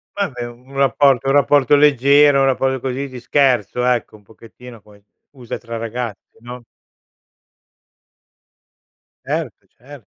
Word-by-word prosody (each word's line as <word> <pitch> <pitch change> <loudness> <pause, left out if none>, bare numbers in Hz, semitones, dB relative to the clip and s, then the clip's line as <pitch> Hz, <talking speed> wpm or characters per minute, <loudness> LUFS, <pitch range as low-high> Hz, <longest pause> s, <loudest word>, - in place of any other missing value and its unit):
Vabbè 140 -12 -4
un 125 +3 -16
rapporto 135 0 +2
un 135 - +2
rapporto 145 0 +3
leggero, 145 0 +4
un - - +3
rapporto 135 0 0
così 130 +2 -4
di 130 -2 -10
scherzo 125 -3 0
ecco, 125 -3 -1
un 105 - -19
pochettino 115 +2 -15
poi 105 0 -21 0.3
usa 125 -4 -8
tra 115 -1 -8
ragazzi, 115 -1 -7
no? 120 +1 -10 2.6
Certo, - - -5
cer 135 -1 -15
125 Hz, 125 wpm, -18 LUFS, 120-140 Hz, 2.6 s, leggero